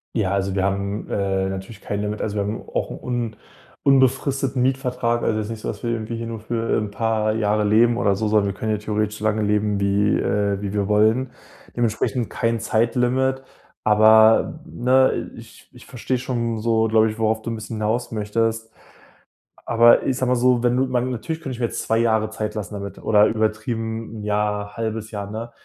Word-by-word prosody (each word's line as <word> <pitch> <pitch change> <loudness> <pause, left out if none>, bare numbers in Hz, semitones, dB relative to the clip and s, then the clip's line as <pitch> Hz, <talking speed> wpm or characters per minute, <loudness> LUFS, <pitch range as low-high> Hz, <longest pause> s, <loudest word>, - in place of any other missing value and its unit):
Ja, 100 -5 0
also, 100 0 -1
wir 95 - +1
haben, 100 +1 -2
äh, 95 -1 0
natürlich 95 +3 -7
kein 100 0 -3
Limit, 105 +1 -3
also, 105 -1 -3
wir 100 - 0
haben 105 +3 -4
auch - - -2
'n - - -7
un 120 -3 -3 0.5
unbefristeten 135 -1 +2
Mietvertrag, 125 -2 0
also, 110 - 0
jetzt 110 0 -3
nicht 115 - -6
so, - - -5
dass 105 - -5
wir 120 - -1
irgendwie 115 0 -3
hier 115 - -5
nur 115 -1 -5
für 115 +1 -1
'n 105 - -3
paar 110 0 0
Jahre 105 -1 +1
leben 115 +3 +4
oder 100 -2 +2
so, 110 +2 -1
sondern 105 -1 +2
wir 100 - -2
können 110 - -1
hier 105 - -1
theoretisch 105 0 -2
so - - -8
lange 110 0 +1
leben, 105 -1 +1
wie, 100 +1 +2
äh, 100 -1 0
wie 100 0 -4
wir 100 -1 0
wollen. 110 +5 +2 0.4
Dementsprechend 120 +1 0
kein 115 -1 0
Zeitlimit. 125 +4 +1 0.4
Aber 110 +1 +5
ne, 130 +2 +1
ich - - -14
ich - - -15
verstehe 125 +1 -3
schon 120 -3 -2
so 110 0 +2
glaube 110 0 +4
ich, 110 - -6
worauf 110 0 +1
du 115 - -5
'n 115 - -3
bisschen 110 0 -6
hinaus 115 +3 -1
möchtest. 115 +1 -1 1.0
Aber 120 0 +5
ich 130 - 0
sage 130 -1 0
mal 125 - +3
so, 125 0 +3
wenn 120 0 +2
du 130 +1 +2
man 130 0 -1
natürlich 145 +7 -4
könnte 130 -2 -5
ich 120 - -10
mir 120 - +2
jetzt - - -5
2 115 0 +1
Jahre 110 -2 +1
Zeit 105 0 -4
lassen 105 0 -5
damit 100 -1 -6
oder 105 -1 +5
übertrieben 110 0 -2
1 - - -7
Jahr, 105 0 -1
0.5 110 -1 -3
Jahr, 100 -2 -5
ne? 115 +2 -6
110 Hz, 205 wpm, -22 LUFS, 105-120 Hz, 1.0 s, Aber